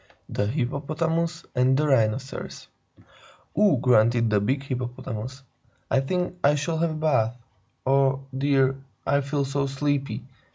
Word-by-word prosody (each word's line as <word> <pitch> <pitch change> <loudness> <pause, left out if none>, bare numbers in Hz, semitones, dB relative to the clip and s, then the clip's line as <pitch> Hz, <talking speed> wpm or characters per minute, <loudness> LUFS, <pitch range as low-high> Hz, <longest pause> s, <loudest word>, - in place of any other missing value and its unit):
THE 105 - -1
HIPPOPOTAMUS 160 +6 -1
AND 130 +1 +3
THE 150 - +2
RHINOCEROS 130 0 0 0.3
Anonymous - - -26 0.2
"Ugh!" - - -2
grunted 115 -2 +4
the 105 - +4
big 135 +6 0
Hippopotamus. 125 -1 -5 0.5
"I 135 - +4
think 180 +5 -2
I 145 +1 +5
shall 160 +3 -1
have 170 0 +2
a 155 - -4
bath. 130 -7 +1 0.5
Oh, 135 0 +2
dear 135 -1 +3
me, 135 - -13 0.3
I 140 0 +2
feel 140 0 -1
so 140 +1 -1
sleepy!" 140 0 -1
135 Hz, 140 wpm, -25 LUFS, 125-145 Hz, 0.5 s, I